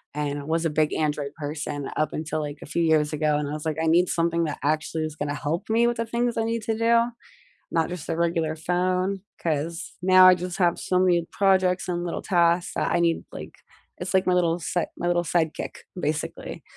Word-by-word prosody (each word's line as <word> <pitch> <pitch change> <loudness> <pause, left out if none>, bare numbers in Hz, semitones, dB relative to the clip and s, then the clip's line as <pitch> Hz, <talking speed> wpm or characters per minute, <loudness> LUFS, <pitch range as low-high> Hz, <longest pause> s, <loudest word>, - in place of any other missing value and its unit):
and 145 -1 -2
I - - -7
was 165 +2 -1
a - - +2
big 150 0 +1
Android 150 -2 -1
person 145 -1 -4
up 155 - 0
until, 155 0 -3
like, 145 0 -5
a - - -8
few 170 +3 -1
years 155 -2 +3
ago, 150 -1 +1
and 150 -1 -2
I - - -5
was 150 +1 -5
like, 155 -1 -1
"I 160 - 0
need 175 +2 +4
something 170 0 +1
that 150 - -3
actually 155 +1 0
is 155 -1 -4
gonna 145 -1 -3
help 155 +8 -3
me 230 +2 +3
with 240 0 0
the 230 - -1
things 235 +1 -1
I 225 - +1
need 230 0 -1
to 220 -1 -1
do, 230 0 +4 0.7
not 165 0 +1
just 180 -4 -7
a 165 - -1
regular 165 -2 0
phone, 185 +3 0 0.2
'cause 165 +1 -2
now 185 0 +7
I 185 - +9
just 180 0 -5
have 175 -3 +2
so 185 0 +1
many 175 -2 +3
projects 190 -2 +2
and 175 -1 -2
little 170 - -3
tasks 170 -2 +2
that - - 0
I - - +2
need 170 -1 +1
like" - - -8 0.5
It's - - -3
like 190 0 +3
my 180 - +3
little 175 -1 +2
set 175 +1 -2
my 175 - -2
little 175 0 +2
sidekick 165 -2 -1 0.3
basically. 150 -1 -3
170 Hz, 225 wpm, -25 LUFS, 155-180 Hz, 0.7 s, I